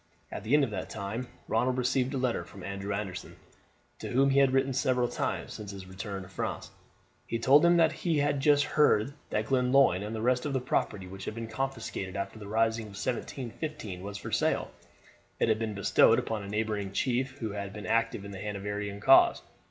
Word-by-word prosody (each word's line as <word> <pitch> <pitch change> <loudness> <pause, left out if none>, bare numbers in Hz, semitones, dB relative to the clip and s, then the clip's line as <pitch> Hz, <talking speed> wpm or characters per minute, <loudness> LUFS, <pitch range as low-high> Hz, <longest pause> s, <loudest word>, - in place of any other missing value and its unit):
At 100 - -6
the 115 +7 +3
end 150 - +5
of 125 - -1
that 95 -3 -4
time 110 +4 -4 0.2
Ronald 125 +3 +1
received 130 +1 +1
a - - 0
letter 125 -2 0
from 95 - -12
Andrew 100 +2 -4
Anderson, 100 -2 -4 0.6
to - - -5
whom 135 +2 +3
he 135 - +4
had 135 -2 +5
written 135 0 +2
several 125 -1 +1
times - - -3
since 105 -2 -8
his 100 -1 -8
return 95 +1 -6
to - - -12
France. 95 - -4 0.6
He 115 - -1
told 135 +5 +5
him 170 0 +5
that 165 -2 +5
he 165 -2 -1
had 145 -1 +1
just 145 +1 +4
heard 140 -5 +3 0.2
that 110 - -1
Glenlyon 125 -6 +3
and 105 +2 -4
the 110 - -3
rest 125 +1 +2
of 145 - -2
the 130 - +1
property 105 -5 -1
which 95 +1 -9
had - - -4
been 115 0 -4
confiscated 110 -5 -4
after 100 +2 -4
the 105 - -9
rising 110 +1 +1
of 105 - -11
1715 120 - -4
was 100 +1 -6
for - - -7
sale. - - +1 0.7
It - - +2
had 110 0 +2
been 110 -2 -3
bestowed 100 - +5
upon 110 -2 -2
a 100 - -7
neighbouring 105 -2 -2
chief, 130 +4 0
who 110 -6 -4
had 100 -1 -5
been 105 +1 -8
active 115 -3 0
in 100 - -7
the 95 - -7
Hanoverian 105 0 -4
cause. 135 +4 +6
110 Hz, 210 wpm, -29 LUFS, 100-130 Hz, 0.7 s, cause